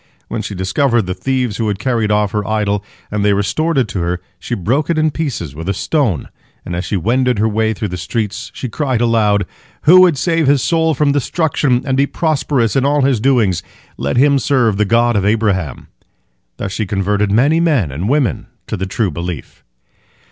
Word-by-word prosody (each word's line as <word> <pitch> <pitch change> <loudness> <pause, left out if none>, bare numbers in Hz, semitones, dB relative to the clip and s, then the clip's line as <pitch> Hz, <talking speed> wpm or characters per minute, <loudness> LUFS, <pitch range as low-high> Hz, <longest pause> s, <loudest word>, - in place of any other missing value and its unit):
When - - -3
she 100 - -6
discovered 115 +6 +1
the 90 0 -3
thieves 125 -2 -2
who 115 - -1
had 100 -2 -1
carried 115 -2 0
off 105 -1 +1
her 105 0 -2
idol, 105 -2 0 0.3
and 105 -1 -1
they 105 0 +3
restored 155 +11 0
it 130 -4 +2
to 95 - -3
her, 85 +1 -1 0.2
she 120 - -4
broke 125 - -1
it 170 - +1
in 155 0 +2
pieces 130 - -4
with 80 +5 -5
a 100 - 0
stone, 125 - -1 0.4
and 85 - -4
as 90 +2 -3
she 100 - -1
wended 125 +6 +1
her 110 +2 +2
way 110 0 0
through 105 0 -3
the 90 - -5
streets, 105 +4 -3
she 130 - -5
cried 130 0 -1
aloud, 110 -4 +2 0.4
"Who 180 +4 +8
would 175 -6 +4
save 165 0 +1
his 140 -1 +3
soul 160 -2 +1
from 145 +1 +2
destruction, 145 -3 0
and 135 -2 0
be 140 +1 +2
prosperous 140 -8 0
in 135 - +2
all 145 +1 +2
his 130 -4 +2
doings, 110 -8 +2 0.3
let 70 - -2
him 140 +1 +4
serve 120 -7 +1
the 105 - +2
God 120 +3 +2
of 100 - +1
Abraham." 100 - 0 0.7
Thus 95 - -4
she 105 +1 -3
converted 100 +1 0
many 140 +10 +3
men 145 - +1
and 85 - -3
women 135 - 0 0.2
to - - -4
the 95 +1 -3
true 100 -1 -1
belief. 85 0 -6
115 Hz, 205 wpm, -16 LUFS, 100-140 Hz, 0.7 s, Who